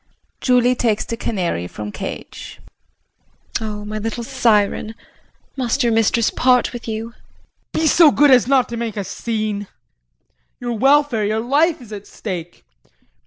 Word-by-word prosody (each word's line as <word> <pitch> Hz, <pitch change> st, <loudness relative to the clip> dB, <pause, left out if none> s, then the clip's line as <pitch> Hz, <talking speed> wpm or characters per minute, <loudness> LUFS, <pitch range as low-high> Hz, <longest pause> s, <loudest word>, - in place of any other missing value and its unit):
JULIE 250 Hz, -1 st, +3 dB
[Takes 225 Hz, -4 st, 0 dB
the 230 Hz, -, -4 dB
canary 180 Hz, -, -2 dB
from 105 Hz, +3 st, -7 dB
cage]. -, -, -8 dB, 1.0 s
Oh, 210 Hz, -1 st, -5 dB
my 215 Hz, +1 st, -4 dB
little 225 Hz, +2 st, -4 dB
siren. 225 Hz, -3 st, +1 dB, 0.6 s
Must 255 Hz, +1 st, 0 dB
your 235 Hz, -1 st, +2 dB
mistress 225 Hz, +1 st, +2 dB
part 250 Hz, -1 st, +2 dB
with 240 Hz, -1 st, -8 dB
you? 225 Hz, +1 st, -4 dB, 0.6 s
JEAN. -, -, +1 dB
Be -, -, +2 dB
so 315 Hz, +1 st, +6 dB
good 290 Hz, 0 st, +4 dB
as 250 Hz, -2 st, +5 dB
not 265 Hz, -2 st, +3 dB
to 235 Hz, -, -5 dB
make 230 Hz, -2 st, -4 dB
a 200 Hz, -, -1 dB
scene. 215 Hz, -1 st, -3 dB, 0.9 s
Your 240 Hz, -1 st, -3 dB
welfare, 270 Hz, -1 st, +3 dB
your 215 Hz, +2 st, 0 dB
life, 285 Hz, +5 st, +1 dB
is 220 Hz, -2 st, -11 dB
at 205 Hz, -1 st, -8 dB
stake. 175 Hz, -, -7 dB
230 Hz, 150 wpm, -20 LUFS, 210-250 Hz, 1.0 s, so